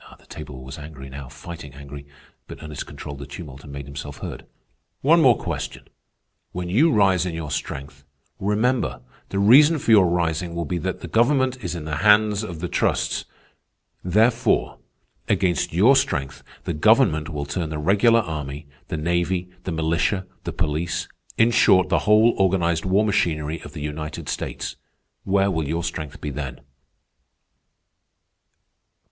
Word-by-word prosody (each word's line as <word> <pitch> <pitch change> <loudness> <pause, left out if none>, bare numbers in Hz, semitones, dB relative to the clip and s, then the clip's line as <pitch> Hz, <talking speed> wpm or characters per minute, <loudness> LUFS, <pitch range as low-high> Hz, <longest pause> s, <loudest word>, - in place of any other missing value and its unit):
The - - -24
table 65 -1 -9
was 65 +2 -8
angry, 75 -3 -10
now, 70 -1 -8
fighting 80 -2 -9
angry; 70 0 -10 0.4
but - - -10
Ernest 75 -2 -6
controlled 70 -1 -8
the 70 - -8
tumult 70 -3 -9
and 70 - -11
made 70 0 -7
himself 70 +1 -8
heard. - - -7 0.5
"One 165 +5 +5
more 125 -6 +6
question. 80 -7 -5 0.6
When 90 0 -4
you 145 - +4
rise 95 -5 +3
in 90 -3 -3
your 80 -3 -5
strength, 70 0 -5 0.4
remember, 105 - 0 0.3
the 100 - -3
reason 140 +11 +6
for 125 - 0
your 100 -5 +7
rising 85 0 -1
will 85 0 -2
be 85 +3 -2
that 95 +3 -3
the - - -6
government 130 +1 +2
is 90 -1 -3
in 80 -3 -6
the 75 -1 -3
hands 105 +3 +4
of 85 -7 -6
the 90 - -2
trusts. - - 0 0.8
Therefore, 110 +6 +2 0.5
against 90 -5 +1
your 105 +11 +5
strength 70 - -1 0.2
the - - -2
government 80 - +3
will 75 -3 -4
turn 80 +3 -3
the 80 - -4
regular 105 +9 +4
army, 75 -4 -5 0.2
the 80 - -3
navy, 85 +3 -1
the 95 - -2
militia, 85 +4 0 0.2
the - - -2
police—in 85 +8 -1
short, 95 -4 +4
the - - +3
whole 110 +2 +6
organized 85 -3 +2
war 95 +3 +3
machinery 80 -6 0
of 75 - -11
the 80 - -7
United 75 +1 -5
States. - - -4 0.5
Where 100 0 +2
will 80 -4 -1
your 85 +3 -2
strength 80 -3 -5
be 75 - -4
then?" 70 -3 -6
85 Hz, 155 wpm, -23 LUFS, 75-100 Hz, 0.8 s, your